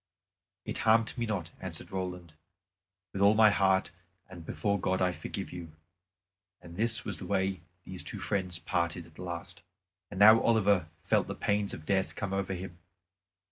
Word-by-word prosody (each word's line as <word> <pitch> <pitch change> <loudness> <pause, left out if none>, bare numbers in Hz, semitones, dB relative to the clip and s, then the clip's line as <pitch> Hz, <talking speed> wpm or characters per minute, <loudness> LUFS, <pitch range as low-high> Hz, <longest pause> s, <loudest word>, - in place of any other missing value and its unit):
"It - - -3
harmed 110 0 +3
me 120 -2 -2
not," 90 -6 -3
answered 90 -3 -6
Roland; 90 -3 -5 0.8
"with 100 - -3
all 100 +2 +6
my 110 -1 +7
heart 95 -1 +2 0.4
and 90 -3 -10
before 100 +4 -1
God 95 +1 0
I 90 -1 +2
forgive - - -6
you." 85 -3 -8 0.9
And 85 -1 -12
this 115 +2 +1
was - - -4
the 95 - -7
way 95 -2 0 0.2
these 95 -1 -6
two - - -7
friends 95 -3 -2
parted 85 -1 -2
at 80 - -18
the - - -11
last. 85 -2 -6 0.5
And 95 - -7
now 110 +2 +8
Oliver 100 -7 +3 0.2
felt - - +2
the - - -4
pains 100 0 0
of 75 - -8
death 95 0 0
come 100 -1 -3
over 95 -1 -1
him. 90 -1 -8
95 Hz, 175 wpm, -30 LUFS, 90-100 Hz, 0.9 s, now